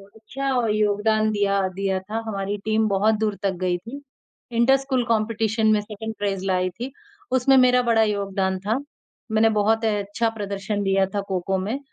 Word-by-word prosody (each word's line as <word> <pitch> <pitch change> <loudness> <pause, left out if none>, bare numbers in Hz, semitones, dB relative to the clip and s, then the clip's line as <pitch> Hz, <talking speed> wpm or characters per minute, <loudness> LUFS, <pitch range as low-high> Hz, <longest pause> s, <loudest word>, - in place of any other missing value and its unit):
अच्छा 245 +5 -5 0.2
योगदान 215 +1 +2
दिया 200 -1 +1
दिया 195 -1 -1
था, 210 +4 -6
हमारी 200 -1 -3
टीम 220 0 +2
बहुत 210 +3 +2
दूर 215 -2 0
तक 195 - +2
गई 180 -1 +1
थी। 230 +10 -9 0.5
इंटर 235 +4 +4
स्कूल 265 -2 -1
कम्पीटीशन 220 0 +1
में 210 - +3
2nd 220 +1 -7
प्राइज़ 195 -2 -2
लाई 185 -1 +1
थी, 245 +9 -7 0.4
उसमें 260 +1 +4
मेरा 250 -1 +5
बड़ा 230 -2 +3
योगदान 195 -2 -1
था। 215 +5 0 0.5
मैंने 220 +1 +4
बहुत 225 +2 +2
अ, - - +3
अच्छा 205 +3 -1
प्रदर्शन 200 0 -3
दिया 195 0 +2
था 200 - +1
खो-खो 190 0 -1
में। 215 +8 -3
215 Hz, 170 wpm, -23 LUFS, 195-225 Hz, 0.5 s, मेरा